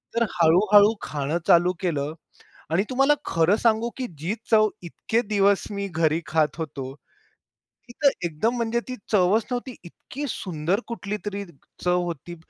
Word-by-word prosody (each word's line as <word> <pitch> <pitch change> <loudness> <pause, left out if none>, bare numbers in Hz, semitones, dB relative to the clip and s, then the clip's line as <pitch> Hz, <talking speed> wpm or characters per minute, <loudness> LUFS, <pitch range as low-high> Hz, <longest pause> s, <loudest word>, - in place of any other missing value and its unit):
तर 235 - +3
हळू-हळू 205 +6 +5
खाणं 145 +2 -2
चालू 175 +1 +5
केलं 150 -4 -2 0.6
आणि 175 +4 +2
तुम्हाला 270 +3 +4
खरं 165 +4 +3
सांगू, 230 +1 +2
की 255 -2 -3
जी 170 +7 -2 0.2
चव 215 -1 +6 0.2
इतके 225 +7 -1
दिवस 200 -2 +2
मी 200 0 -3
घरी 165 -2 +1
खात 155 -1 +1
होतो, 140 -5 -5 1.0
ती - - -11
तर 280 - +8 0.2
एकदम 170 +9 -1
म्हणजे 235 0 0
ती 255 - -4 0.2
चवच 205 +2 +3
नव्हती, 245 0 -4
इतकी 255 - -8
सुंदर 180 -1 -2
कुठलीतरी 205 -2 -4 0.4
चव 180 0 +2
होती. 170 0 -6
195 Hz, 145 wpm, -24 LUFS, 165-225 Hz, 1.0 s, तर